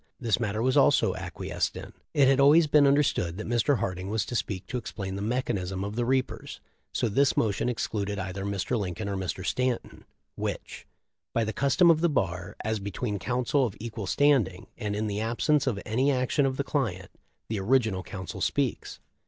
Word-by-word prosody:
This 115 Hz, -3 st, +1 dB
matter 110 Hz, -1 st, -1 dB
was 130 Hz, 0 st, +2 dB
also -, -, +4 dB
acquiesced -, -, -3 dB
in. -, -, -9 dB, 0.2 s
It 140 Hz, -2 st, +5 dB
had 135 Hz, 0 st, +4 dB
always 150 Hz, +4 st, +7 dB
been 145 Hz, -1 st, +5 dB
understood 135 Hz, -, +2 dB
that 110 Hz, -, -5 dB
Mr. 120 Hz, +4 st, +2 dB
Harding 90 Hz, -1 st, -3 dB
was 110 Hz, 0 st, 0 dB
to 120 Hz, -, -5 dB
speak 100 Hz, -4 st, -2 dB
to 125 Hz, -, -3 dB
explain 95 Hz, -4 st, -5 dB
the 100 Hz, -, -4 dB
mechanism 100 Hz, -5 st, -2 dB
of 100 Hz, +1 st, -4 dB
the 120 Hz, 0 st, 0 dB
reapers. 130 Hz, 0 st, -1 dB, 0.3 s
So -, -, 0 dB
this 135 Hz, +6 st, +2 dB
motion 110 Hz, +2 st, +1 dB
excluded 105 Hz, -4 st, -2 dB
either 95 Hz, 0 st, -4 dB
Mr. 100 Hz, +4 st, -1 dB
Lincoln 100 Hz, +1 st, -4 dB
or 100 Hz, -, -2 dB
Mr. 95 Hz, 0 st, -3 dB
Stanton, 125 Hz, +1 st, -2 dB, 0.2 s
— -, -, -52 dB
which? -, -, -5 dB, 0.5 s
By 115 Hz, -, +3 dB
the 110 Hz, 0 st, -2 dB
custom 165 Hz, -, +4 dB
of 160 Hz, -1 st, +2 dB
the 170 Hz, -, +3 dB
bar, 95 Hz, -, -2 dB
as 110 Hz, 0 st, 0 dB
between 100 Hz, +2 st, -3 dB
counsel 125 Hz, +6 st, +1 dB
of 100 Hz, -, -9 dB
equal 110 Hz, -3 st, -5 dB
standing, 120 Hz, -9 st, +2 dB
and 105 Hz, -3 st, -3 dB
in 105 Hz, +1 st, -1 dB
the 105 Hz, -1 st, -2 dB
absence 120 Hz, +6 st, +1 dB
of 110 Hz, -6 st, 0 dB
any 130 Hz, +6 st, +2 dB
action 130 Hz, +2 st, +1 dB
of 130 Hz, 0 st, -3 dB
the 140 Hz, -, 0 dB
client, 110 Hz, -, -2 dB, 0.4 s
the 110 Hz, -2 st, -2 dB
original 110 Hz, -2 st, +2 dB
counsel 95 Hz, -3 st, -7 dB
speaks. -, -, -1 dB
110 Hz, 195 wpm, -27 LUFS, 100-130 Hz, 0.5 s, always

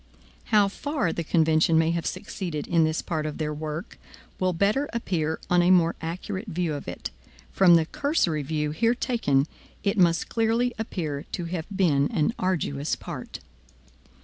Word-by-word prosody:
How 210 Hz, -3 st, +4 dB
far 270 Hz, -, -2 dB
the 170 Hz, -, -3 dB
convention 160 Hz, 0 st, +3 dB
may 160 Hz, 0 st, +3 dB
have 170 Hz, -1 st, -1 dB
succeeded 185 Hz, -4 st, -4 dB
in 170 Hz, -2 st, +3 dB
this 155 Hz, +1 st, -1 dB
part 155 Hz, -2 st, -2 dB
of 150 Hz, -, -5 dB
their 150 Hz, -1 st, -2 dB
work, 155 Hz, +1 st, -6 dB, 0.4 s
will 185 Hz, 0 st, +2 dB
better 205 Hz, +11 st, +1 dB
appear 160 Hz, -9 st, -1 dB
on 180 Hz, 0 st, +4 dB
a 175 Hz, -, +3 dB
more 170 Hz, -2 st, +4 dB
accurate 185 Hz, +5 st, -4 dB
view 175 Hz, -4 st, -1 dB
of 145 Hz, -, -6 dB
it. 90 Hz, -, -5 dB, 0.4 s
From 180 Hz, -3 st, +6 dB
the 165 Hz, -1 st, +4 dB
cursory 185 Hz, -, 0 dB
view 150 Hz, +1 st, -2 dB
here 230 Hz, +9 st, +2 dB
taken, 145 Hz, -, +1 dB, 0.4 s
it 200 Hz, 0 st, +1 dB
must 170 Hz, -2 st, +3 dB
clearly 230 Hz, +2 st, +1 dB
appear 160 Hz, -10 st, -3 dB
to 175 Hz, -, -2 dB
have 165 Hz, -1 st, -4 dB
been 165 Hz, -8 st, +2 dB
an 155 Hz, +8 st, +1 dB
arduous 155 Hz, -5 st, -1 dB
part. -, -, -8 dB
170 Hz, 165 wpm, -26 LUFS, 155-200 Hz, 0.4 s, From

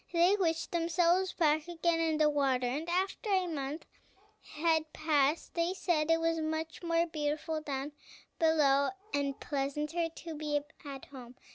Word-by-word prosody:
They 350 Hz, +3 st, +4 dB
wished 330 Hz, -5 st, 0 dB
themselves 345 Hz, +2 st, +2 dB
back 310 Hz, -1 st, +2 dB
again 340 Hz, -1 st, 0 dB
in 320 Hz, -1 st, +1 dB
the 305 Hz, -1 st, +4 dB
water, 270 Hz, -4 st, +1 dB
and 290 Hz, +7 st, -2 dB
after 380 Hz, +5 st, -1 dB
a 375 Hz, -2 st, +3 dB
month 300 Hz, -2 st, -4 dB, 0.7 s
had 315 Hz, 0 st, +1 dB
passed 305 Hz, -1 st, +1 dB
they 340 Hz, +2 st, 0 dB
said 330 Hz, -5 st, 0 dB
it 330 Hz, 0 st, +4 dB
was 330 Hz, 0 st, +1 dB
much 315 Hz, 0 st, -3 dB
more 335 Hz, -1 st, +2 dB
beautiful 310 Hz, 0 st, -2 dB
down 280 Hz, -1 st, -4 dB, 0.5 s
below, 285 Hz, -4 st, +4 dB, 0.2 s
and 280 Hz, -1 st, -1 dB
pleasanter 295 Hz, +4 st, -2 dB
to 330 Hz, 0 st, -8 dB
be 300 Hz, -1 st, -1 dB, 0.2 s
at 275 Hz, -2 st, -8 dB
home. 255 Hz, -3 st, -11 dB
315 Hz, 150 wpm, -32 LUFS, 290-335 Hz, 0.7 s, They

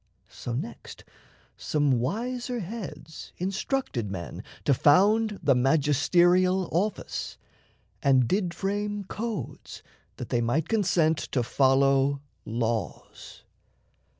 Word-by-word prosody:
So 120 Hz, -, -7 dB
next 120 Hz, -1 st, -6 dB, 0.5 s
Some 145 Hz, -5 st, +1 dB
wiser 240 Hz, -, -2 dB
heads 170 Hz, -6 st, -8 dB
instructed 190 Hz, -, -2 dB
men 90 Hz, -3 st, -6 dB, 0.2 s
to 140 Hz, -, +4 dB
found 205 Hz, -, +4 dB
The 140 Hz, -2 st, +5 dB
magisterial 175 Hz, +7 st, +3 dB
office, 195 Hz, +5 st, -2 dB, 0.6 s
and 130 Hz, -3 st, +4 dB
did 185 Hz, -, 0 dB
frame 205 Hz, +3 st, -2 dB
Codes 210 Hz, -, -6 dB, 0.3 s
that -, -, -7 dB
they 120 Hz, -, +1 dB
might 120 Hz, +7 st, 0 dB
consent 175 Hz, -7 st, +2 dB, 0.2 s
to 125 Hz, -, +2 dB
follow 135 Hz, +2 st, +3 dB, 0.3 s
laws. 115 Hz, -2 st, -4 dB
160 Hz, 95 wpm, -27 LUFS, 135-200 Hz, 0.6 s, The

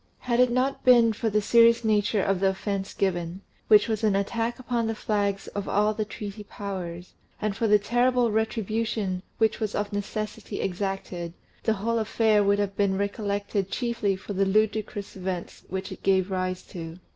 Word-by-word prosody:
If 250 Hz, -, -3 dB
it 235 Hz, -, +3 dB
had 250 Hz, 0 st, +6 dB
not 255 Hz, +3 st, 0 dB
been 235 Hz, -3 st, +6 dB
for 225 Hz, +1 st, -1 dB
the 210 Hz, 0 st, +1 dB
serious 230 Hz, +2 st, +5 dB
nature 210 Hz, -1 st, +2 dB
of 195 Hz, -2 st, +1 dB
the 195 Hz, 0 st, +3 dB
offence 195 Hz, 0 st, -3 dB
given, 175 Hz, -1 st, -1 dB, 0.3 s
which 210 Hz, -1 st, +6 dB
was 220 Hz, -1 st, -2 dB
an 210 Hz, -3 st, +3 dB
attack 230 Hz, +4 st, -1 dB
upon 240 Hz, -2 st, -1 dB
the 225 Hz, -, -1 dB
flags 200 Hz, -2 st, -1 dB
of 205 Hz, -1 st, -4 dB
all 210 Hz, +1 st, +2 dB
the 215 Hz, 0 st, -2 dB
treaty 210 Hz, 0 st, -7 dB
Powers, 185 Hz, -4 st, -6 dB, 0.3 s
and 210 Hz, -2 st, -1 dB
for 225 Hz, -, 0 dB
the 210 Hz, 0 st, +6 dB
terrible 240 Hz, +2 st, +2 dB
retribution 220 Hz, -3 st, -1 dB, 0.2 s
which 220 Hz, -1 st, +2 dB
was 215 Hz, -2 st, -2 dB
of 205 Hz, 0 st, -2 dB
necessity 215 Hz, +1 st, -4 dB
exacted, 185 Hz, -2 st, -3 dB, 0.3 s
the 220 Hz, -, +2 dB
whole 230 Hz, +3 st, -1 dB
affair 220 Hz, -1 st, +3 dB
would 200 Hz, 0 st, +3 dB
have 200 Hz, -1 st, -1 dB
been 195 Hz, -1 st, +1 dB
recollected 200 Hz, -1 st, -2 dB
chiefly 230 Hz, -5 st, -1 dB
for 190 Hz, +2 st, -7 dB
the 195 Hz, 0 st, +2 dB
ludicrous 210 Hz, +1 st, 0 dB
events 185 Hz, -2 st, -5 dB
which 190 Hz, +1 st, -4 dB
it -, -, -8 dB
gave 190 Hz, 0 st, +2 dB
rise 185 Hz, -1 st, -2 dB
to. 165 Hz, -1 st, -8 dB
205 Hz, 180 wpm, -26 LUFS, 195-225 Hz, 0.3 s, had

